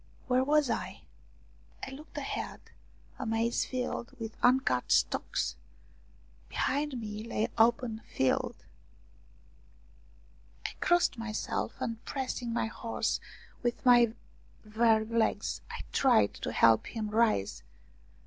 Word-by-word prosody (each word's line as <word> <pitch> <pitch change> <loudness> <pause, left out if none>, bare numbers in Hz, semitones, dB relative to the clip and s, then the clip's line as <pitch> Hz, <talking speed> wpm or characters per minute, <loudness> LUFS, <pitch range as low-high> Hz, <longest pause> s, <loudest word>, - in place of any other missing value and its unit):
Where 255 0 +3
was 295 +1 +3
I? - - -3 0.8
I 265 - -8
looked 295 +4 -11
ahead - - -4 0.6
a - - -3
maize 225 +1 +1
field 255 0 -3
with 225 -1 -5
uncut 245 - +3
stalks; - - +1 0.9
behind 280 -1 -1
me 210 -1 -5
lay 225 -1 -1
open 230 0 +3
field. 240 - 0 2.1
I - - -1
crossed 350 -8 +2
myself, 225 -1 -3
and 230 -1 -4
pressing 255 -3 -3
my 235 - 0
horse 230 +1 -2 0.4
with 240 0 -2
my 240 -2 +6 0.6
weary 220 -1 +4
legs, 230 0 0
I - - -5
tried 110 - +4
to - - -4
help 115 -1 +4
him 215 -3 -4
rise. 215 - +2
235 Hz, 110 wpm, -30 LUFS, 220-255 Hz, 2.1 s, my